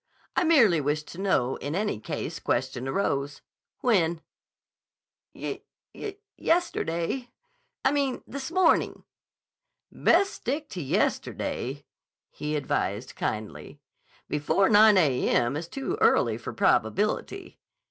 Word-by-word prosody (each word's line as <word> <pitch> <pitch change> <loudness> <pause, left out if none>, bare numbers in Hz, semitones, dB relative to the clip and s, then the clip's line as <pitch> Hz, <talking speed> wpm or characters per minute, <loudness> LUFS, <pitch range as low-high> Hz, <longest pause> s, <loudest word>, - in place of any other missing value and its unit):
I - - +3
merely 230 - +5
wished 150 +2 -2
to 175 - -9
know, 135 -10 +1
in 145 +2 -4 0.3
case - - -4
any - - -13
question 130 -1 -1
arose. 140 -3 -1 0.4
When?" 170 -9 +2 1.1
"Ye—ye—yesterday. 330 - -3 0.6
I 265 - +5
mean, 280 -3 -1
this 275 0 -6
morning." 370 +2 +2 0.9
"Best 390 +3 +3
stick 290 +4 -3
to 180 - -5
yesterday," 135 0 -2 0.5
he 150 +1 -3
advised 130 -5 -2
kindly. 105 -1 -4 0.5
"Before 150 +6 +2
9 215 -1 +7
a.m. 130 -5 +2
is 165 +3 -4
too 275 - -4
early - - +3
for - - -6
probability." - - 0
170 Hz, 105 wpm, -27 LUFS, -, 1.1 s, 9